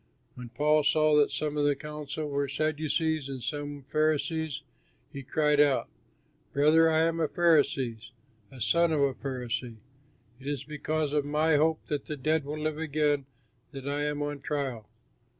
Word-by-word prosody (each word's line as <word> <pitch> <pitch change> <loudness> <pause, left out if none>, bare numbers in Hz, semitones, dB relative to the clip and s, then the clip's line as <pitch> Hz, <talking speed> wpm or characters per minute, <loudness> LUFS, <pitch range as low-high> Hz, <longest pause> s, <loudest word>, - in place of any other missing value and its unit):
When 125 -1 -9
Paul 150 +5 +3
saw 155 +1 +3
that 145 - +4
some 150 -1 -2
of 145 - +2
the 145 -1 +3
council 150 +1 -5
were 140 0 -1
Sadducees 155 +1 -1
and 130 -3 -6
some 145 +2 -4
Pharisees, 155 +1 0 0.5
he 140 - -6
cried 150 +2 +1
out, 145 -2 +3 0.6
"Brothers, 155 +3 +5
I 160 0 +3
am 165 0 +1
a 160 - +2
Pharisee, 145 -9 +2 0.5
a 130 - -13
son 170 +9 +3
of 140 -4 +2
Pharisees. 125 -3 -4 0.6
It 135 - -10
is 145 -3 -2
because 155 0 -2
of 150 -1 +2
my 150 +2 +2
hope 155 +2 +2
that 145 -2 -3
the 150 - -5
dead 155 +2 0
will 150 +2 -4
live 155 0 -2
again 145 -3 0 0.5
that 135 0 -7
I 145 +1 -1
am 150 0 -1
on 145 -1 -4
trial!" 135 -6 -3
150 Hz, 165 wpm, -28 LUFS, 140-155 Hz, 0.6 s, Brothers